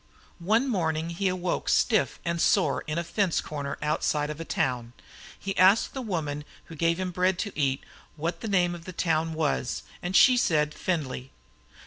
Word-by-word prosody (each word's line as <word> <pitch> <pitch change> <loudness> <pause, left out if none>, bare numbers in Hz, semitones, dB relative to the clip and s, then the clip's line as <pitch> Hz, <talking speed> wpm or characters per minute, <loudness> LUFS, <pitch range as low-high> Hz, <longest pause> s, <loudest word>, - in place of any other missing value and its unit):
One 220 +9 +2
morning 165 -7 -1
he 190 +3 -1
awoke 185 -1 -1
stiff 220 -4 +2
and 170 -1 -1
sore - - +3
in 155 +1 -2
a 170 - 0
fence 190 0 0
corner 140 -2 -4
outside 150 0 0
of 150 - -8
a - - -3
town. 125 -6 -2 0.5
He 195 0 -4
asked 195 +8 +5
a 265 - -3
woman 155 - -3 0.2
who 165 - -11
gave 165 +2 +1
him 185 -1 -2
bread 180 +1 +1
to 205 +1 -4
eat, 135 -2 0 0.3
what 165 +3 -3
the 225 - -4
name 180 -4 +2
of 170 -1 -9
the 185 - -7
town 165 -1 0
was, 150 -5 -1 0.2
and 180 +2 -3
she 255 +3 +7
said 150 -9 +2
Findlay. 135 -7 -3
170 Hz, 180 wpm, -27 LUFS, 150-185 Hz, 0.5 s, she